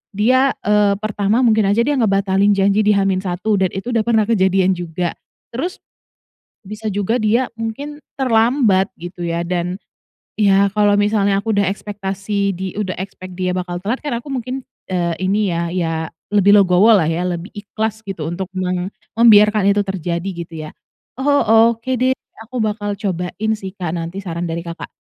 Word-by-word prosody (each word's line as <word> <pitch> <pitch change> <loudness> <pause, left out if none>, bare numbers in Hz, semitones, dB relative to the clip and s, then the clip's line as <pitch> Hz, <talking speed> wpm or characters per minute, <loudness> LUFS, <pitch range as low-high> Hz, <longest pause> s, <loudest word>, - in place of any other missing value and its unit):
dia, 255 +6 +3
eee, 205 -1 +3
pertama 215 +3 +1
mungkin 220 -4 +3
aja 210 +4 +3
dia 290 - 0
ngebatalin 200 -1 +2
janji 200 +1 +2
di 210 -1 +3
H-1 195 +1 0
dan 190 - +3
itu 195 +6 -4
udah 230 - +2
pernah 220 -2 +3
kejadian 190 -3 +2
juga, 175 -1 -2 0.4
terus 310 +10 -4 0.8
bisa 215 +1 -6
juga 205 +4 0
dia 235 +2 +1
mungkin 230 +7 -5 0.2
terlambat 225 -5 +3
gitu 175 0 -7
ya, 170 0 -1
dan 180 +2 -2 0.5
ya 200 -1 +3
kalau 205 -1 +3
misalnya 205 -1 +2
aku 220 +2 -1
udah 200 -2 +2
ekspektasi 200 -1 -3
di 190 -1 -4
udah 200 -3 -3
ekspek 185 -1 -8
dia 185 -1 -1
bakal 180 -1 -3
telat 210 +8 -3
kan 290 -5 -2
aku 270 +4 -7
mungkin, 255 +1 -4 0.2
eee, 175 -2 0 0.2
ini 200 -2 +1
ya 170 0 -1
ya 170 -2 -1 0.4
lebih 205 0 +6
legowo 190 +2 +5
lah 165 - +2
ya, 165 +2 -1
lebih 175 +3 -5
ikhlas 220 +1 -4
gitu 195 -7 -6
untuk 175 +4 -4
mem 180 0 -1 0.2
membiarkan 210 -2 +5
itu 205 0 +2
terjadi 175 -1 -3
gitu 170 -1 -8
ya. - - -8 0.5
Oh, 235 -5 +4
oke 230 +3 -6
deh, 260 +1 +2 0.3
aku 235 +3 -7
bakal 205 -1 -2
cobain 195 +2 -2
sih, 195 -3 -7
Kak, 180 -5 -4
nanti 175 +3 -5
saran 170 -1 -4
dari, 165 +1 -3
Kakak. 170 0 -7
200 Hz, 170 wpm, -19 LUFS, 185-220 Hz, 0.8 s, lebih